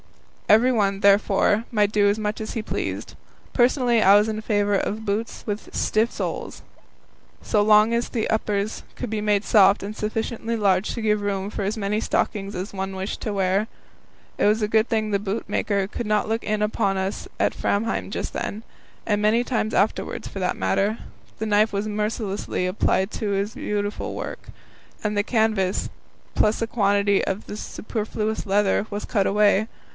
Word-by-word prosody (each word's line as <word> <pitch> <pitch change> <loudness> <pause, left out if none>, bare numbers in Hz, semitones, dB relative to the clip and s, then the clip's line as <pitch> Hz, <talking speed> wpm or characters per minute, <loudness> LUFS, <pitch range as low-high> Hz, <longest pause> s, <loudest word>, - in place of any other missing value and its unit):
Everyone, 215 -3 +4
therefore, 200 +1 +3
might 210 -2 +2
do 205 -1 +4
as 205 - +1 0.4
he 225 - -2
pleased. 215 - -4 0.4
Personally 245 -2 +3
I 195 0 +7
was 210 +1 +4
in 215 0 -3
favour 205 -2 +1
of 215 +3 -2
boots 210 +2 -3
with 210 -1 -5
stiff 220 +2 +1
soles, - - -4 0.8
so 210 - +1
long 215 +2 +5
as 235 +1 0
the 225 -3 -2
uppers 210 -1 -1
could 245 - -5
be 215 -1 -2
made 210 -1 +1
soft 200 -2 +5
and 205 +2 -5
sufficiently 225 +2 -2
large 195 -2 +2
to 235 - -4
give 210 -1 +2
room 200 0 -2
for - - -4
as 205 +3 -2
many 210 +1 -1
stockings 200 -3 -1
as 185 +2 -5
one 190 0 -4
wished 190 +2 -4
to 215 - -2
wear. 195 +1 +1 0.7
It - - +3
was 210 +2 +3
a - - +2
good 220 +2 +2
thing 215 -2 0
the 200 - +2
boot 205 +2 -3
maker 200 -2 0
could 225 +2 -5
not 210 0 +1
look 225 +1 -1
in 215 0 -1
upon 205 -2 0
us 190 +1 -3
at - - +2
Framheim 220 +3 -1
just - - -4
then 215 +2 -4 0.4
and 210 -2 +1
many 225 +3 +3
times 220 -3 -1
afterwards, 205 - 0
for 195 - -7
that 180 -1 -1
matter. 195 - +1 0.4
The 220 - -3
knife 215 +1 +3
was 200 +1 -2
mercilessly 210 -3 -2
applied 190 +1 +1
to 215 - -3
all - - 0
his 200 +3 -1
beautiful 205 0 -3
work, - - -6 0.5
and 210 -1 -1
all 205 - 0
the - - +2
canvas, 215 -5 +1 0.5
plus 215 +1 +2
a 230 - 0
quantity 200 -2 +2
of 195 +3 -3
the - - -7
superfluous 215 0 -3
leather, 200 +1 +2
was 205 0 -4
cut 200 -4 +1
away. 205 +1 +3
210 Hz, 180 wpm, -23 LUFS, 200-220 Hz, 0.8 s, I